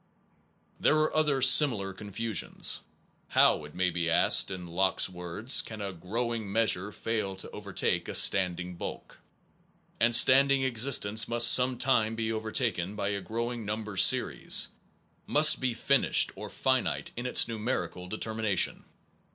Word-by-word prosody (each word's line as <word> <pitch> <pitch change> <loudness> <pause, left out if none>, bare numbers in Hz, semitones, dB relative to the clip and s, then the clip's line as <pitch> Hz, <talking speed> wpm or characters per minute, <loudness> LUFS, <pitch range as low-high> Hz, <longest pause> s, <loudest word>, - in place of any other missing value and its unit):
There - - +2
are 155 0 -1
other 150 -4 0
similar 110 -11 +5
confusions. 105 +2 -3 0.5
How/ 75 - +2
it 75 - -15
may 90 0 -1
be 85 0 -3
asked, 85 - +3
in 90 -2 -8
Locke 95 +2 -2
s - - 0
words, 90 +7 -1
can 110 -1 -10
a 100 -2 -6
growing 110 +4 -5
measure 105 -3 0
fail 105 -3 -4
to 95 - -10
overtake - - -3
a - - -3
standing 90 -1 +2
bulk? - - -9 0.8
And 115 0 +4
standing 135 +1 +5
existence 115 -4 +1
must 120 0 +6
some 125 0 +4
time 115 -5 0
be 110 0 -3
overtaken 110 -4 -3
by 105 -1 -3
a 100 -1 -4
growing 115 +4 -5
number 105 0 -6
series, - - +3 0.6
must 155 +1 +3
be 125 -3 -3
finished 135 +3 +1
or - - -9
finite - - -2
in 120 +1 -5
its 125 - +3
numerical 105 -6 -5
determination. 110 -1 -2
110 Hz, 145 wpm, -27 LUFS, 95-120 Hz, 0.8 s, must